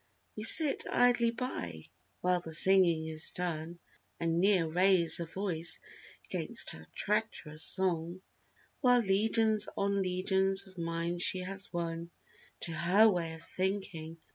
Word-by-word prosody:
We 215 - -7
sit 290 +6 +7
idly 240 -1 +2
by 90 - -6 0.4
while 180 0 +1
the 160 -2 -4
singing 175 -3 +4
is 160 0 0
done. 170 -1 -5 0.4
And 165 0 -1
ne'er 190 -3 +2
raise 180 0 +2
a 170 - -5
voice 170 -2 -1 0.5
'gainst - - 0
her 80 0 -13
treacherous 205 -8 -2
song; 180 -1 +1 0.6
While 245 -3 +3
legions 215 +1 +1
on 200 0 -1
legions 190 +1 +1
of 190 -1 -18
minds 170 +1 -4
she 185 0 +1
has 195 +2 -4
won 170 -1 -5 0.5
To 170 - -5
her 180 +7 +3
way 165 -3 -4
of 160 - -14
thinking. 185 -3 -5
180 Hz, 135 wpm, -30 LUFS, 165-200 Hz, 0.6 s, sit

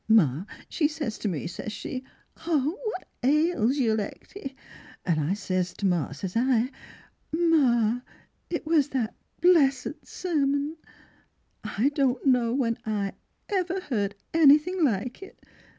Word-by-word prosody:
Ma 180 - +4 0.2
she 300 - +1
sez 300 -8 -4
to - - -2
me, 170 -6 -2
sez 175 +5 -5
she, 255 +4 -5 0.4
'What 335 - -1
ails 285 -2 +2
you 235 -5 +2
Lecty?' 265 - -5 0.5
And 165 -4 +2
I 155 +6 0
sez 185 -3 -1
to 200 - -3
ma, 175 -6 +1
sez 175 +7 -6
I, 250 +1 +2 0.3
* - - -36
Ma, 260 -9 +3 0.5
it 340 -2 -3
was 310 -3 +3
that 245 -5 -1 0.3
blessed 295 -6 +3
sermon. 290 -3 -1 0.9
I 235 +7 +1
don't 275 -3 0
know 250 -3 +3
when 235 -3 0
I 205 -3 -2 0.3
ever 375 -2 0
heard 210 - -2 0.2
anything 325 +3 +5
like 245 - 0
it 390 - -11
260 Hz, 135 wpm, -27 LUFS, 215-310 Hz, 0.9 s, anything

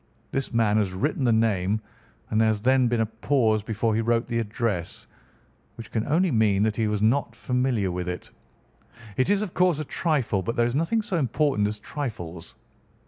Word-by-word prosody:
This 135 0 -2
man 110 -3 +2
has 100 -4 0
written 140 +9 -1
the 120 - +4
name, 110 -2 +1 0.5
and 110 - +3
there 110 - +4
has 110 -1 +1
then 130 +1 +3
been 120 -1 +1
a - - +2
pause 110 0 +1
before 110 +1 -1
he 110 - +1
wrote 115 +1 +1
the 115 -1 0
address, 105 -5 -3 0.7
which 115 -1 -10
can 110 -1 -1
only 170 +4 +2
mean 105 -4 +3
that 110 -1 +1
he 110 -2 +1
was 105 0 -1
not 125 +6 +1
familiar 125 -6 0
with 90 0 -3
it. 90 -1 -6 0.8
It 130 - +1
is, 205 0 +2
of 190 - -6
course, 180 -4 +3
a 155 - -4
trifle, 140 - 0
but 115 +5 -3
there 120 - +3
is 120 - -1
nothing 165 - +1
so 185 - -2
important 135 -5 +1
as 105 +1 -4
trifles. 105 - -6
115 Hz, 195 wpm, -25 LUFS, 105-135 Hz, 0.8 s, the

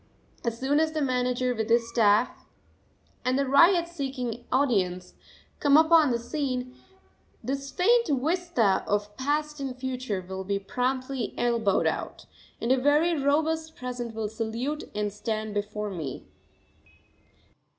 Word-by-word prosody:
As 235 -1 -2
soon 280 +3 +2
as 315 0 +1
the 310 - -1
manager 250 -1 0
with 220 -1 -3
his 230 0 +3
staff, 225 -1 +2 0.8
and 255 +1 +1
the 280 - +1
ryots 340 +6 +5
seeking 255 -6 -4
audience, 190 -9 +1 0.5
come 285 0 +5
upon 315 -2 +6
the 240 - +1
scene, 255 0 -3 0.7
this 275 +1 -3
faint 470 +10 +3
vista 300 - +1
of 205 0 -1
past 300 +2 -1
and 265 -2 -4
future 255 -7 -3
will 190 0 -5
be 200 +1 -1
promptly 255 +5 -2
elbowed 230 -5 +1
out, - - -3 0.3
and 235 - -1
a 260 - +5
very 300 +5 +3
robust 315 +3 0
present 245 -2 -5
will 220 -1 -2
salute 230 +7 -3
and 210 -1 -1
stand 215 0 -3
before 210 0 -3
me. 155 -8 -6
255 Hz, 135 wpm, -27 LUFS, 220-290 Hz, 0.8 s, upon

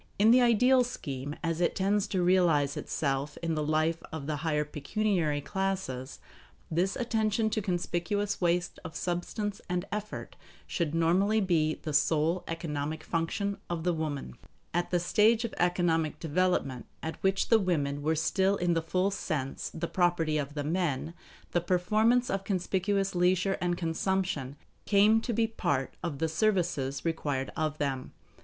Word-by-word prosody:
In 215 +3 +6
the 250 +1 +6
ideal 250 +2 +5
scheme, 145 - -5
as 165 0 -1
it 175 - +2
tends 200 +1 +1
to 185 -2 0
realize 170 -6 +3
itself 140 0 -2
in 165 -1 0
the 155 - -1
life 155 +2 +1
of 160 -3 -5
the 150 0 -2
higher 150 0 0
pecuniary 155 0 0
classes, 190 -8 -3 0.5
this 180 +4 +1
attention 220 -2 0
to 215 - 0
conspicuous 195 +2 -1
waste 175 0 0
of 160 -2 -8
substance 190 +4 -3
and 180 0 -1
effort 210 +1 -5 0.3
should 165 -3 -2
normally 185 +6 +3
be 165 -6 +2
the 155 - -6
sole 155 +4 +2
economic 155 -2 -3
function 200 +5 -2
of 170 -2 -2
the 180 0 +2
woman. 150 - -3 0.4
At 175 +1 0
the 175 - +2
stage 220 +6 +3
of 230 - -5
economic 175 -3 +1
development 160 -6 0 0.2
at 160 -1 -5
which 190 0 +1
the 225 - +6
women 145 -7 0
were 160 +2 +1
still 190 +5 +2
in 175 -2 +1
the 165 - +1
full 185 +4 0
sense 145 -8 -3
the 170 +1 -3
property 170 -4 +1
of 145 0 -4
the 145 - -2
men, 160 -1 -1 0.4
the 175 - +1
performance 215 +8 +2
of 195 0 -1
conspicuous 195 +1 0
leisure 185 +2 +2
and 175 -1 0
consumption 165 -5 -1 0.3
came 210 +2 +5
to 240 - -3
be 230 0 +2
part 140 -12 -1
of 170 -5 -3
the 160 - 0
services 160 -7 0
required 145 -5 -1
of 155 -1 -1
them. 135 -3 -3
175 Hz, 160 wpm, -29 LUFS, 155-195 Hz, 0.5 s, In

